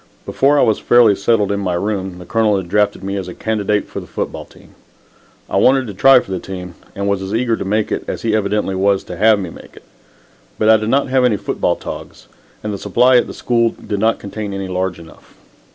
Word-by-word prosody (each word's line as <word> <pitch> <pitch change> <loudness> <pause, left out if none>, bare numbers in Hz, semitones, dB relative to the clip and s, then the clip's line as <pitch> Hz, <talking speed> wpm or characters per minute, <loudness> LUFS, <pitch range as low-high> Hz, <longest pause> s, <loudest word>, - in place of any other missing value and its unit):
Before 140 +2 +2
I - - +4
was 110 - +2
fairly 120 -4 +5
settled 105 0 +1
in 100 - -1
my 90 -3 -1
room, 95 -1 -3
the 90 - -11
Colonel 110 0 +1
had 95 -2 -4
drafted 105 +2 0
me 100 +1 -3
as 95 -2 -5
a 90 - -8
candidate 105 -1 -1
for - - -6
the - - -11
football - - -5
team. - - -20 0.7
I - - -1
wanted 130 0 +4
to 105 - -7
try 130 +7 +6
for 95 - -11
the 95 - -2
team, 90 -1 -8 0.2
and 100 0 -3
was 100 -1 0
as 95 +2 -3
eager 115 -1 +1
to - - -5
make 105 +2 -1
it - - -2
as - - -5
he 110 -1 +1
evidently 105 -1 0
was 95 +1 +1
to 90 - -8
have 110 +2 +4
me 90 -4 -5
make - - -14
it. - - -15 0.7
But 110 - +2
I 110 - +7
did 110 +1 -3
not 140 +2 +1
have 130 0 +2
any 120 -5 +3
football - - -1
togs, - - -9 0.4
and 105 -1 -3
the 100 - -5
supply 125 +6 +3
at 120 - +2
the - - -8
school 115 -1 +1
did 100 - -5
not 110 +2 +2
contain 100 0 -6
any 95 -1 -4
large 95 0 -2
enough. 80 -1 -16
105 Hz, 240 wpm, -17 LUFS, 95-115 Hz, 0.7 s, I